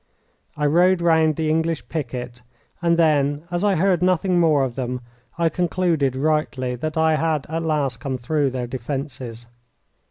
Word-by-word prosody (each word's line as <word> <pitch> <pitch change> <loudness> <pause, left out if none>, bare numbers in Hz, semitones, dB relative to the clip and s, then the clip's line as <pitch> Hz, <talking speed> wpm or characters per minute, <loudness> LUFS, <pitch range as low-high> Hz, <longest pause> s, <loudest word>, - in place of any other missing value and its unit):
I 150 - 0
rode 175 +5 +4
round 160 -2 +3
the 160 0 -1
English 160 +1 0
picket, 125 -5 -5 0.4
and 170 -1 +2
then, 145 -2 +2
as 175 +2 -1
I 205 -2 +3
heard 180 0 +2
nothing 180 0 +2
more 155 -5 +4
of 130 -2 -2
them, 125 0 -4 0.4
I 170 -1 +2
concluded 165 -6 0
rightly 135 -3 0
that 155 +5 -4
I 160 -1 +3
had 155 -3 0
at 165 +1 -2
last 150 -7 -1
come 135 -2 -3
through 145 +3 0
their 125 -1 -3
defences. 125 -1 -5
155 Hz, 160 wpm, -22 LUFS, 130-165 Hz, 0.4 s, rode